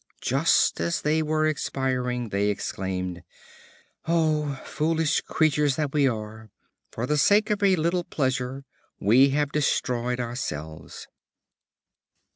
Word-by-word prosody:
Just - - +2
as 85 0 -1
they 155 +2 +2
were 155 0 0
expiring, 130 -5 -1
they 100 +1 0
exclaimed, 95 -3 -3 0.9
"O 155 -4 +1
foolish 160 0 0
creatures 150 -3 +1
that 150 -3 -2
we 145 -2 +3
are! 110 -2 -5 0.4
For 115 - -3
the 150 +3 +1
sake 210 +8 +4
of 205 -1 0
a 195 -2 +4
little 170 +1 0
pleasure 130 -1 -2 0.3
we 125 +7 +5
have 145 +1 0
destroyed 125 -4 0
ourselves." 115 - -6
135 Hz, 115 wpm, -25 LUFS, 120-155 Hz, 0.9 s, we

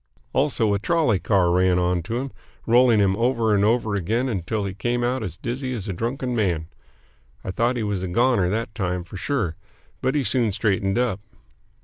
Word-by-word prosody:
Also, 125 -7 +2
a 100 - 0
trolley 135 - +2
car 95 -4 +2
ran 90 0 +3
on 90 0 +1
to 115 +8 -4
him, 135 +1 -4 0.3
rolling 120 0 +5
him 100 -2 +3
over 115 -2 +2
and 100 -1 +3
over 110 0 +2
again 110 +7 0
until 105 -1 -2
he 95 - -4
came 120 +4 -1
out 125 +1 0
as 90 -6 -5
dizzy 130 +1 -3
as 110 -3 -5
a 100 - -2
drunken 125 +5 -2
man. 90 -8 0 0.8
I - - -3
thought 120 +5 0
he 115 - -1
was 105 -3 -2
a 95 - -3
"goner" 115 -1 +2
that 110 +3 -2
time 90 -4 -2
for 90 - -10
sure, 100 - -2 0.4
but 130 +2 0
he 145 - +2
soon 120 -3 +2
straightened 95 0 0
up. 120 -6 0
110 Hz, 200 wpm, -23 LUFS, 95-120 Hz, 0.8 s, rolling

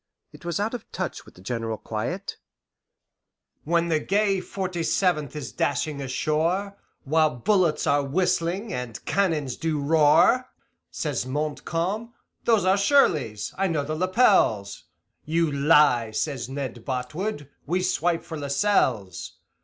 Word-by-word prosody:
It - - -14
was 170 +2 -2
out 215 +3 -1
of 245 - -7
touch - - -4
with - - -17
the - - -15
general 115 0 -3
quiet: 120 - -4 1.3
"When 170 +2 +1
the 160 -2 +2
gay 200 +3 +1
Forty 185 -2 -4
Seventh 160 -4 0
is 150 -3 -5
dashing 145 +1 -1
ashore, 160 +9 -1 0.3
While 155 -1 +2
bullets 170 - +2
are 145 0 +3
whistling 180 +6 0
and 125 -2 -5
cannons 160 -9 0
do 160 -2 -1
roar, 160 - +4 0.4
Says 140 -5 -3
Montcalm, 165 - -3 0.3
'Those 225 -5 +3
are 190 +1 +4
Shirleys 155 - +2
I 195 - +2
know 160 -5 0
the 155 +2 -4
lapels.' 185 - +2 0.4
'You 165 0 +1
lie,' 140 -5 +4
says 125 +1 -3
Ned 130 -4 -5
Botwood, 145 - -3 0.2
'we 180 +4 0
swipe 175 -2 0
for 160 - -7
Lascelles! 140 - 0
155 Hz, 130 wpm, -25 LUFS, 140-185 Hz, 1.3 s, roar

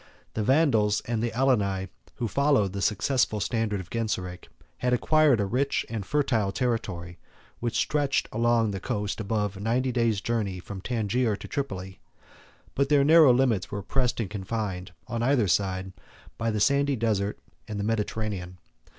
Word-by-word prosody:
The 110 - -2
Vandals 110 -5 +3
and 115 -1 -2
Alani, 115 -6 +1 0.3
who 120 - -2
followed 140 -7 +2
the 100 - -3
successful 110 +2 +1
standard 110 -1 -1
of 90 -2 -9
Genseric, 95 -6 -3 0.3
had 125 0 +1
acquired 150 0 +4
a 100 - +1
rich 130 +7 0
and 110 -3 -3
fertile 115 -5 +1
territory, 90 -8 -3 0.4
which 120 -1 -2
stretched 145 -2 +1
along 115 -1 +2
the 95 - -4
coast 105 -2 -3
above 105 -2 -2
ninety 125 +4 +1
days' 115 -4 +1
journey 105 -4 -2
from 95 +1 -8
Tangier 115 0 0
to - - -9
Tripoli; 95 - -4 0.7
but 140 0 +1
their 145 -2 +5
narrow 155 -2 +7
limits 120 -6 +2
were 100 -2 -5
pressed 125 +4 0
and 115 - -1
confined, 100 -3 -4 0.2
on 115 -1 -3
either 120 -3 +3
side, 95 0 0 0.4
by 115 0 -1
the 110 -1 -1
sandy 140 +5 +3
desert 105 -3 0 0.3
and 105 -2 -4
the - - -1
Mediterranean. 105 -4 -2
110 Hz, 155 wpm, -27 LUFS, 100-125 Hz, 0.7 s, narrow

